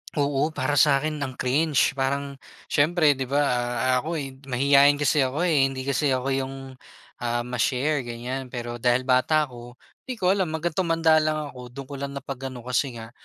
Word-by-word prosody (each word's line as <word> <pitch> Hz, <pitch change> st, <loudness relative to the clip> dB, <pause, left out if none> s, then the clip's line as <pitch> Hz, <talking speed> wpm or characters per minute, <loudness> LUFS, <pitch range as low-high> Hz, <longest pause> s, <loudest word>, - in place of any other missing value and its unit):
Oo, 145 Hz, +2 st, 0 dB
para 145 Hz, -1 st, +1 dB
sakin 150 Hz, +1 st, +3 dB
ang 130 Hz, -2 st, -4 dB
cringe, 145 Hz, +2 st, +2 dB
parang 140 Hz, +1 st, -2 dB, 0.3 s
siyempre 155 Hz, +1 st, +4 dB
'di 135 Hz, -2 st, -3 dB
ba, 145 Hz, +2 st, +2 dB
ah, 125 Hz, 0 st, 0 dB
ako, 165 Hz, +5 st, -4 dB
eh, 135 Hz, -3 st, -6 dB
mahiyain 140 Hz, +2 st, +5 dB
kasi 145 Hz, +1 st, +1 dB
ako, 135 Hz, +6 st, 0 dB
eh, 145 Hz, -6 st, +3 dB
hindi 130 Hz, -1 st, -5 dB
kasi 140 Hz, 0 st, +1 dB
ako 130 Hz, +2 st, -2 dB
yung, 135 Hz, 0 st, -2 dB, 0.6 s
ah, 120 Hz, 0 st, -1 dB
ma-share 125 Hz, +3 st, -1 dB
ganyan, 125 Hz, +3 st, -5 dB
pero 120 Hz, -1 st, -6 dB
dahil 125 Hz, +1 st, +2 dB
bata 130 Hz, +4 st, +3 dB
ako 120 Hz, -2 st, -10 dB, 0.3 s
di 255 Hz, -, -4 dB
ko 185 Hz, -4 st, +2 dB
alam, 190 Hz, -3 st, +1 dB
hanggang 170 Hz, +1 st, -2 dB
tumanda 165 Hz, -2 st, +3 dB
lang 155 Hz, 0 st, 0 dB, 0.2 s
ako 125 Hz, -1 st, -10 dB
do'n 135 Hz, +3 st, -9 dB
ko 140 Hz, +2 st, -9 dB
lang 140 Hz, 0 st, -5 dB
na 140 Hz, -, -6 dB
pag-ano 130 Hz, -3 st, -7 dB
kasi 125 Hz, 0 st, -1 dB
nga 115 Hz, 0 st, -9 dB
135 Hz, 185 wpm, -25 LUFS, 125-150 Hz, 0.6 s, mahiyain